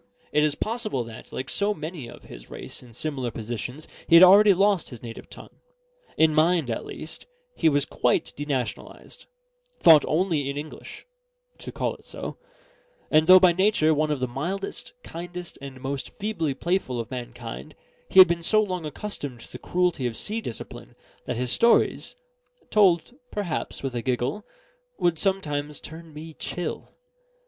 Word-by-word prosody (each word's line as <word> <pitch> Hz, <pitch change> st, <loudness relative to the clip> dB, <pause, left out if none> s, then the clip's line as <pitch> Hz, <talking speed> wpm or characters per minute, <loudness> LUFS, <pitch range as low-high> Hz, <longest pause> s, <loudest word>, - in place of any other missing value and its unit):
It 150 Hz, -, +3 dB
is 150 Hz, -1 st, +2 dB
possible 215 Hz, -, -2 dB
that, 115 Hz, -1 st, -11 dB
like 130 Hz, -, -5 dB
so 205 Hz, +1 st, +1 dB
many 155 Hz, -5 st, -6 dB
of -, -, -13 dB
his -, -, -12 dB
race -, -, -9 dB
in 125 Hz, -, -15 dB
similar 130 Hz, -1 st, -2 dB
positions, 120 Hz, +6 st, -6 dB, 0.2 s
he 165 Hz, -, +6 dB
had 170 Hz, -, +10 dB
already 200 Hz, +3 st, +8 dB
lost 195 Hz, -1 st, +2 dB
his 120 Hz, -3 st, -11 dB
native 115 Hz, -1 st, -9 dB
tongue. -, -, -13 dB, 0.6 s
In 160 Hz, -1 st, +4 dB
mind, 160 Hz, -4 st, +3 dB
at 115 Hz, -, -4 dB
least, 155 Hz, -, -9 dB, 0.3 s
he 160 Hz, -, +3 dB
was 145 Hz, -1 st, +1 dB
quite 125 Hz, -, 0 dB
denationalised; 140 Hz, -4 st, -5 dB, 0.5 s
thought 160 Hz, -3 st, +8 dB
only 155 Hz, -4 st, +1 dB
in 140 Hz, -, -4 dB
English 150 Hz, +1 st, -8 dB, 0.5 s
to -, -, -7 dB
call -, -, -2 dB
it -, -, -21 dB
so; -, -, -7 dB, 0.7 s
and 155 Hz, +1 st, +4 dB
though 185 Hz, 0 st, +10 dB
by 185 Hz, -1 st, +6 dB
nature 180 Hz, -3 st, +3 dB
one 155 Hz, 0 st, +1 dB
of 150 Hz, -2 st, -1 dB
the 130 Hz, -, -1 dB
mildest, 175 Hz, -, -5 dB
kindest, 175 Hz, +1 st, -8 dB
and 135 Hz, -2 st, -9 dB
most 135 Hz, 0 st, -4 dB
feebly 195 Hz, -9 st, -2 dB
playful 170 Hz, -9 st, -1 dB
of 115 Hz, -, -5 dB
mankind, 120 Hz, +3 st, -7 dB, 0.3 s
he -, -, -3 dB
had 185 Hz, 0 st, +11 dB
been 170 Hz, 0 st, -1 dB
so 215 Hz, +6 st, +4 dB
long 185 Hz, -6 st, -1 dB
accustomed 145 Hz, -, -6 dB
to -, -, -13 dB
the -, -, -8 dB
cruelty 175 Hz, -8 st, 0 dB
of 115 Hz, -, -5 dB
sea 220 Hz, +2 st, -1 dB
discipline, 115 Hz, -, -8 dB, 0.3 s
that -, -, -3 dB
his 125 Hz, 0 st, -1 dB
stories 235 Hz, -, +3 dB, 0.6 s
(told 190 Hz, -2 st, +4 dB, 0.2 s
perhaps 190 Hz, -9 st, -3 dB
with 135 Hz, -2 st, -3 dB
a 120 Hz, -, -2 dB
giggle) 130 Hz, -, -1 dB, 0.5 s
would 170 Hz, -2 st, +1 dB
sometimes 150 Hz, -7 st, -1 dB
turn 160 Hz, +1 st, -11 dB
me 155 Hz, +2 st, -9 dB
chill. 175 Hz, +3 st, -5 dB
155 Hz, 165 wpm, -25 LUFS, 130-180 Hz, 0.7 s, had